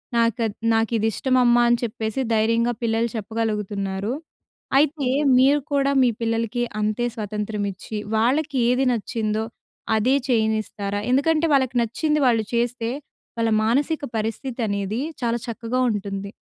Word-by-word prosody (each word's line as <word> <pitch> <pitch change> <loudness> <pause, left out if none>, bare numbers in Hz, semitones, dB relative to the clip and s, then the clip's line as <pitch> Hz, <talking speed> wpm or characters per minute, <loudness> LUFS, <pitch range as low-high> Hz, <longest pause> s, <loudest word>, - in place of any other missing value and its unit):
నాకద్ 230 -2 +1 0.2
నాకు 225 +1 +1
ఇది 220 0 +1
ఇష్టం 260 +4 0
అమ్మా 240 0 +5
అని 240 0 +4
చెప్పేసి 220 +1 -2
ధైర్యంగా 230 +2 +2
పిల్లలు 230 0 +1
చెప్పగలుగుతున్నారు. 210 -2 -2 0.6
అయితే 285 -1 +2 0.3
మీరు 275 +3 +5
కూడా 280 0 +2
మీ 250 - +5
పిల్లలకి 230 +1 -1 0.2
అంతే 215 +3 0
స్వతంత్రం 210 -1 -3
ఇచ్చి 195 +3 -7 0.2
వాళ్ళకి 275 +6 +1
ఏది 250 +2 +2
నచ్చిందో 220 -1 -1 0.5
అదే 240 +5 +3
చేయనిస్తారా? 220 -4 0
ఎందుకంటే 310 +5 +3
వాళ్ళకి 260 -2 +2
నచ్చింది 300 +7 0
వాళ్ళు 225 -3 +2
చేస్తే 235 0 0 0.5
వాళ్ళ 230 0 +1
మానసిక 285 +8 +1
పరిస్థితి 225 +4 -4
అనేదీ 200 +3 -2 0.2
చాలా 235 0 +1
చక్కగా 235 +2 -3
ఉంటుంది. 200 -1 -4
230 Hz, 130 wpm, -23 LUFS, 215-250 Hz, 0.6 s, అమ్మా